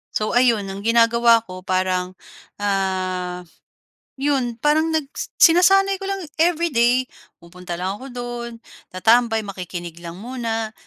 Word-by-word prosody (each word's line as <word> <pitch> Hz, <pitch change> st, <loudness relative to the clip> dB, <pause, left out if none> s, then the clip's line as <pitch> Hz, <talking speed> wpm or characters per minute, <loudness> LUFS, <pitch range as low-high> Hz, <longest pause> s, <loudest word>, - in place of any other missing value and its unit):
So, 215 Hz, -, 0 dB
ayun 240 Hz, -4 st, +3 dB
ang 195 Hz, -, -7 dB
ginagawa 230 Hz, +1 st, +4 dB
ko 185 Hz, -3 st, -9 dB
parang, 185 Hz, 0 st, -1 dB, 0.4 s
ah, 185 Hz, -3 st, -2 dB, 0.7 s
'yon 265 Hz, -4 st, 0 dB
parang 310 Hz, +2 st, +3 dB
nag 300 Hz, -3 st, -1 dB, 0.3 s
sinasanay 390 Hz, +3 st, +5 dB
ko 390 Hz, -, -6 dB
lang 390 Hz, -2 st, -3 dB, 0.2 s
everyday 285 Hz, -8 st, +2 dB, 0.4 s
pupunta 175 Hz, +1 st, -8 dB
lang 190 Hz, +4 st, -4 dB
ako 265 Hz, -, -10 dB
do'n, 240 Hz, -1 st, -5 dB, 0.4 s
tatambay, 225 Hz, +3 st, +3 dB
makikinig 175 Hz, -3 st, -7 dB
lang 170 Hz, -1 st, -8 dB
muna 225 Hz, -2 st, -4 dB
230 Hz, 120 wpm, -21 LUFS, 185-255 Hz, 0.7 s, sinasanay